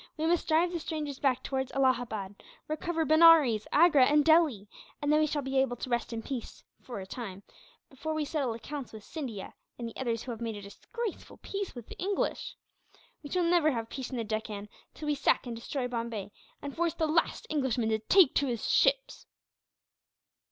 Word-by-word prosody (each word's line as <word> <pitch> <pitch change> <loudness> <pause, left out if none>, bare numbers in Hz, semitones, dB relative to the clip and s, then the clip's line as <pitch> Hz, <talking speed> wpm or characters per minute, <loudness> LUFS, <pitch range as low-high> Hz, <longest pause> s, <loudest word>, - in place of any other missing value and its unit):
We 310 - -1
must 340 +1 +1
drive 335 +2 +3
the 345 - -2
strangers 300 -4 -4
back 260 -3 +1
towards 265 -1 -2
Allahabad; 235 -7 0 0.3
recover 320 +1 -1
Benares, 315 -9 +6
Agra, 295 -5 +6
and 295 0 +4
Delhi; 315 - +4 0.3
and 290 0 +1
then 305 - +5
we 310 - +3
shall 290 -1 -2
be 265 0 0
able 265 -2 +1
to 255 - -6
rest 240 0 0
in 225 -1 -4
peace, 260 -2 -6 0.2
for 240 -6 -7
a 190 - -6
time, 200 -2 -7 0.4
before 300 +4 -5
we 310 -1 -1
settle 280 -6 -1
accounts 270 +2 -7
with 215 -1 -9
Scindia, 245 - -6 0.2
and 235 - -4
the 230 - -9
others 230 -3 -2
who 255 - -5
have 230 0 -7
made 225 -2 -3
a - - -8
disgraceful 435 - -6
peace 395 -5 -4
with 240 -3 -8
the - - -11
English. 390 +2 -2 0.7
We 290 - -9
shall 360 +2 +1
never 335 -2 +4
have 230 -1 -4
peace 265 -2 -5
in 255 - -4
the 230 - -1
Deccan 215 -1 -4 0.3
till 305 - -7
we 300 - +1
sack 285 -1 +2
and 240 -2 -5
destroy 250 +3 -3
Bombay, 230 -4 -4 0.3
and 285 -1 -6
force 340 -1 0
the 320 - 0
last 320 +2 +1
Englishman 260 -6 0
to 220 0 +1
take 335 - +5
to 280 - +2
his 235 -3 -2
ships." - - +2
270 Hz, 200 wpm, -30 LUFS, 230-315 Hz, 0.7 s, Benares